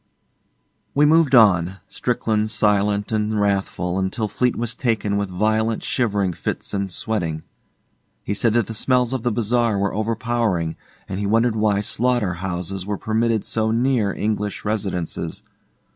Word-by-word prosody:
We 145 +1 +5
moved 155 -2 +5
on, 95 -6 +5
Strickland 110 -1 -1
silent 105 -1 +1
and 110 0 0
wrathful, 95 -3 0
until 95 +3 -1
Fleete 125 +3 0
was 120 0 -2
taken 110 -5 0
with 100 -1 -1
violent 110 +4 0
shivering 100 -7 0
fits - - -4
and 100 -1 -1
sweating. 85 -5 -2 0.8
He 100 - -2
said 110 +2 +1
that 120 -3 +3
the 115 - -6
smells 125 +2 +1
of 130 - -2
the 120 - 0
bazaar 115 0 +1
were 100 0 0
overpowering, 110 -6 -1 0.3
and 95 - -4
he 100 - -1
wondered 115 +2 +2
why 105 -2 +2
slaughter 120 -2 0
houses 90 +1 -3
were 100 +1 -3
permitted 110 0 0
so 110 -1 0
near 115 -2 +1
English 105 0 -2
residences. 100 -5 -3
105 Hz, 145 wpm, -22 LUFS, 100-115 Hz, 0.8 s, We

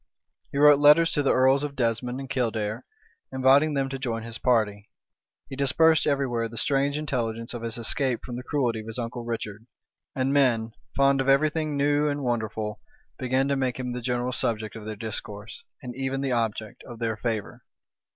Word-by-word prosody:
He - - -4
wrote 145 0 +7
letters 150 +3 +6
to 145 - +1
the 140 - +2
earls 130 +2 +4
of 145 -1 -4
Desmond 125 +1 -1
and 135 - -6
Kildare, 115 -5 -2 0.5
inviting 135 +3 +4
them 135 -1 0
to 135 0 -5
join 115 -4 -3
his 115 0 -5
party: 110 -4 +1 0.6
he 135 - -7
dispersed 155 +4 +3
every 140 -1 +2
where 115 -2 -2
the 115 - -10
strange 140 +2 +1
intelligence 115 -6 -3
of 120 - -5
his 115 0 -3
escape 120 +1 -1
from 120 - -6
the 125 - -5
cruelty 125 -4 -1
of 110 - -9
his 115 - -5
uncle 120 0 -4
Richard: 115 -1 -5 0.5
and 135 0 0
men, 120 -5 +2 0.2
fond 140 0 +3
of 135 - 0
every 145 +3 +4
thing 155 -2 -2
new 145 +1 +2
and 145 -1 -2
wonderful, 110 -3 -2 0.4
began 130 +1 +1
to 140 - +2
make 130 -2 -1
him 125 -1 -3
the 125 - -4
general 125 +1 -1
subject 110 -4 -1
of 110 -1 -8
their 110 - -4
discourse, 105 0 -5 0.2
and 125 -1 -7
even 135 0 -2
the 135 -1 -1
object 110 -3 -2
of 120 - -8
their 115 -1 -1
favor. 110 -1 -4
125 Hz, 195 wpm, -26 LUFS, 115-140 Hz, 0.6 s, wrote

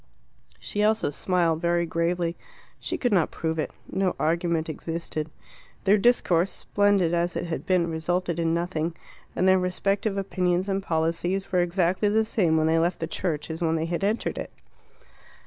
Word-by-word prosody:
She 210 - -3
also 215 -6 +2
smiled, 165 0 +1
very 170 0 +2
gravely. 170 +1 -1 0.4
She - - -3
could 245 -4 0
not 175 -5 +3
prove 160 0 -3
it. - - -1 0.2
No 190 -1 0
argument 165 0 0
existed. 160 -1 -4 0.5
Their 205 +1 +4
discourse, 195 -6 +3
splendid 200 -5 +1
as 175 +1 0
it - - -2
had 165 -1 -4
been, 180 -2 +3
resulted 170 +1 -1
in 165 -1 +1
nothing, 170 -1 -1 0.4
and 185 - +2
their 190 0 +5
respective 195 +3 -1
opinions 185 -1 0
and 195 0 0
policies 170 +3 -1
were 180 - +3
exactly 180 +3 +1
the 220 +1 +2
same 175 -7 +2
when 155 - +2
they 160 +1 +3
left 170 +2 0
the 165 - -1
church 160 -2 -3
as 160 +2 -6
when 165 -1 +1
they 160 0 -1
had 170 +3 -2
entered 210 +3 -1
it. - - -5
175 Hz, 170 wpm, -26 LUFS, 165-190 Hz, 0.5 s, their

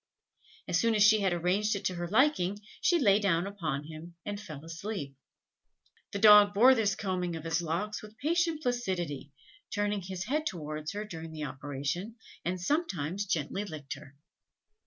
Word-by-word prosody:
As - - +2
soon 230 -1 +2
as 210 - +5
she 215 0 +6
had 190 -2 +2
arranged 185 +5 +1
it 200 0 -5
to 185 - +1
her 175 0 -4
liking, 205 - +2 0.2
she 350 - +4
lay 205 -9 +4
down 185 -4 +1
upon 165 -8 -3
him, 160 +3 -10
and 205 0 -4
fell 155 -5 -9
asleep. 165 -4 -5 1.0
The - - -3
dog 205 -1 +8
bore 250 +6 +8
this 215 -5 +1
combing 185 -4 -2
of 160 - -6
his 165 +1 0
locks 175 +6 -2
with 215 +1 -13
patient 330 +1 0
placidity, 180 - -2 0.4
turning 205 -1 0
his 185 0 -5
head 305 +8 -1
towards 155 -2 -4
her 210 +1 -4
during 165 -5 -8
the 155 -1 -6
operation, 145 - -4 0.3
and 180 +1 -2
sometimes 195 - -1
gently 170 +3 -1
licked 155 -7 -6
her. 140 -1 -13
190 Hz, 170 wpm, -30 LUFS, 160-210 Hz, 1.0 s, dog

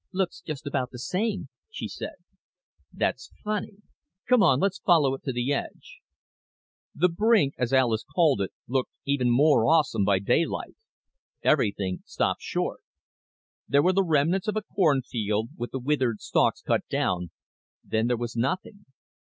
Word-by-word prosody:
"Looks 185 -2 -2
just 155 -1 -6
about 130 -3 -1
the 125 - -10
same," 195 - -2 0.2
she 460 - -5
said. - - -7 0.8
"That's - - -2
funny. 210 -1 -4 0.4
Come 250 -3 +5
on; 140 -9 +5
let's 195 +2 0
follow 155 -7 +4
it 135 - -6
to 135 - -1
the 120 +3 -1
edge." - - -6 1.0
The 180 - +4
brink, 195 -4 +2
as 125 -1 0
Alis 120 -5 +2
called 155 - +2
it, 95 - -2 0.2
looked 130 +1 0 0.2
even 140 -3 +1
more 125 -1 +4
awesome 155 -9 +3
by 100 0 +3
daylight. 120 - 0 0.7
Everything 100 -9 +1
stopped - - -1
short. - - -3 0.9
There 140 +1 +3
were 185 - +3
the 195 - +3
remnants 165 +4 +1
of 215 - 0
a 215 - -1
cornfield, 120 - 0
with 120 +1 -5
the - - -4
withered 130 -4 0
stalks - - +1
cut - - +1
down, 90 -1 -1 0.5
then 110 +1 0
there 120 -1 +1
was 120 0 -5
nothing. 185 - -3
140 Hz, 155 wpm, -26 LUFS, 120-185 Hz, 1.0 s, Come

